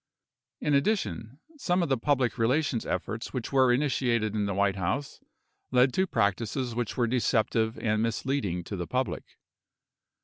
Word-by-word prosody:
In 150 - 0
addition, 140 - 0 0.2
some 180 -9 +1
of 165 - -2
the 135 - +3
public 125 -2 0
relations 125 +1 +1
efforts 110 +5 -3
which 125 -3 -3
were 130 -2 +5
initiated 120 -5 +1
in 105 -2 0
the 100 - -2
White 100 0 +1
House 115 +11 -2 0.5
led 125 0 +4
to 190 0 +1
practices 115 - 0
which 120 -1 -3
were 120 - +3
deceptive 115 -2 +1
and 110 -1 0
mis 115 0 -1
leading 100 -11 -1
to 100 - -6
the 90 -2 -4
public. 130 0 -3
120 Hz, 160 wpm, -28 LUFS, 110-135 Hz, 0.5 s, were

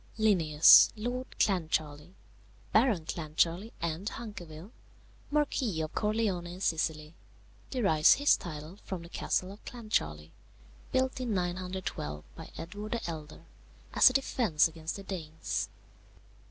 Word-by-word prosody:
"Linnæus, 165 -9 +7
Lord 245 +4 -4
Clancharlie, 160 -3 -1 0.6
Baron 215 -8 +3
Clancharlie 165 +6 -1
and 170 +5 -2
Hunkerville, 185 -5 -9 0.6
Marquis 270 - 0
of 155 0 -4
Corleone 210 -5 0
in 175 +1 -8
Sicily, 160 -3 -1 0.6
derives 195 -12 +4
his 285 +1 +4
title 160 +2 -8
from 185 -3 -5
the 170 - -12
castle 185 +1 -1
of 200 - -13
Clancharlie, 80 - -3 0.6
built 260 0 0
in 235 -5 -1
912 180 - -3
by - - -10
Edward 205 +6 -6
the 235 - -3
Elder, 160 0 -8 0.5
as - - +8
a - - -5
defence 230 - +2
against 160 0 -6
the 200 - -8
Danes. 160 -5 -4
180 Hz, 120 wpm, -30 LUFS, 160-215 Hz, 0.6 s, as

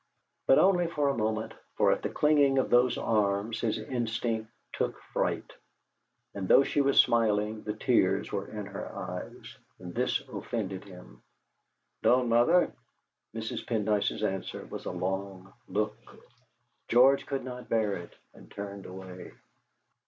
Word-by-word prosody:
But 135 - +7
only 180 -2 +4
for 150 -4 0
a 140 - 0
moment, 110 0 -1 0.2
for - - +4
at - - 0
the - - -2
clinging 145 -2 +3
of 130 - +1
those 120 0 +4
arms 105 +1 0
his 115 -2 0
instinct 110 -1 -2 0.2
took - - -2
fright. - - -1 0.8
And 95 -2 -4
though 135 - +7
she 145 - +1
was 140 0 +3
smiling, 110 -2 +3
the 105 - -4
tears 100 -4 +2
were 100 0 -3
in 105 -2 -6
her 100 0 -7
eyes, - - -7 0.2
and 90 -1 -9
this 125 +2 +1
offended 105 -6 -4
him. 75 -12 -14 0.8
"Don't, 125 -1 +3
mother!" 120 +10 +4 0.6
Mrs. 110 0 -4
Pendyce's 105 -2 0
answer 95 -2 -3
was - - -8
a - - -2
long 95 +1 -4
look. 105 +3 -1 0.9
George 130 +3 +5
could 135 -1 -2
not 125 0 -8
bear 110 -3 +1
it, 85 - -9 0.2
and - - -16
turned 100 -1 -7
away. 95 -1 -9
110 Hz, 145 wpm, -29 LUFS, 100-125 Hz, 0.9 s, But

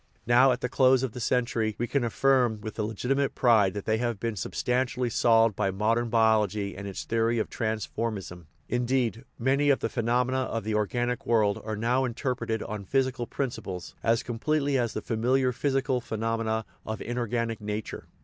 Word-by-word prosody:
Now, 125 +3 +5
at 125 +1 -1
the - - 0
close 130 0 +4
of 130 - -1
the 125 - -8
century, 115 -3 0
we 120 - -1
can 140 +1 0
affirm 120 -1 +2
with 110 +1 -7
legitimate 125 +6 -1
pride 110 -6 +4
that 100 - -5
they 110 0 +1
have 120 -4 -1
been 115 +1 -2
substantially 125 +4 -1
solved 115 -2 +4
by 100 -1 0
modern 115 +5 0
biology 110 -3 +2
and 100 +1 -6
its 100 - -5
theory 115 +1 +1
of 110 - -2
transf 110 -2 -2
ormism; 95 -7 -4 0.2
indeed, 120 -1 0
many 135 +4 +2
of 140 - +5
the - - -2
phenomena 125 +3 +1
of 115 -4 -2
the 110 +1 -2
organic 120 +3 -1
world 105 -3 +2
are 110 -1 -4
now 120 +4 +1
interpreted 120 -3 -2
on 105 -1 -5
physical 130 +2 0
prin 135 -3 -2
ciples 95 -6 -7
as 115 0 +2
completely 140 +4 0
as 120 -3 0
the 110 - -4
familiar 125 +3 +1
physical 130 0 0
phenome 115 0 -2
na 110 0 0 0.2
of 110 -1 -5
inorganic 115 -1 -2
nature. 105 0 -5
115 Hz, 180 wpm, -27 LUFS, 110-125 Hz, 0.2 s, Now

